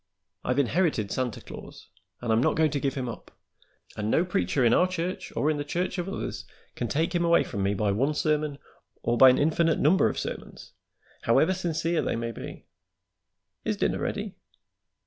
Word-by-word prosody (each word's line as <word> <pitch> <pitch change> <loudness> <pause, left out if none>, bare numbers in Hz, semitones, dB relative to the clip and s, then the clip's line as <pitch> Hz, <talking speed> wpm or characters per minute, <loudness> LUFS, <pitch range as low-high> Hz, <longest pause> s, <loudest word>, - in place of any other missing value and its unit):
I've 125 +1 0
inherited 140 - +1
Santa 125 -3 -2
Claus, - - -11 0.3
and 115 -2 +1
I'm 110 - +3
not - - +2
going 155 -2 +3
to 140 - -1
give 135 -1 -1
him 130 -2 -3
up, 115 - -8 0.7
and 105 0 -2
no 170 - +3
preacher 130 - +1
in 115 - +5
our 180 - +4
church 185 +1 -4
or 150 - +2
in 150 - -1
the 145 - -2
church 180 +5 -2
of 175 +2 -3
others 195 - -4 0.3
can - - -3
take 165 +4 0
him 175 -1 +1
away 170 0 +4
from 100 - -4
me 100 +1 +1
by 105 0 +1
one 135 +9 +1
sermon, 150 -1 0 0.5
or 120 - +1
by 130 +2 +9
an 130 - +4
infinite 160 +2 +2
number 165 +7 +4
of - - -5
sermons, - - -6 0.5
however 190 - +4
sincere 170 -2 -1
they - - -1
may 115 0 -3
be. - - -9 1.0
Is - - -1
dinner - - 0
ready?" - - -3
145 Hz, 190 wpm, -27 LUFS, 120-170 Hz, 1.0 s, by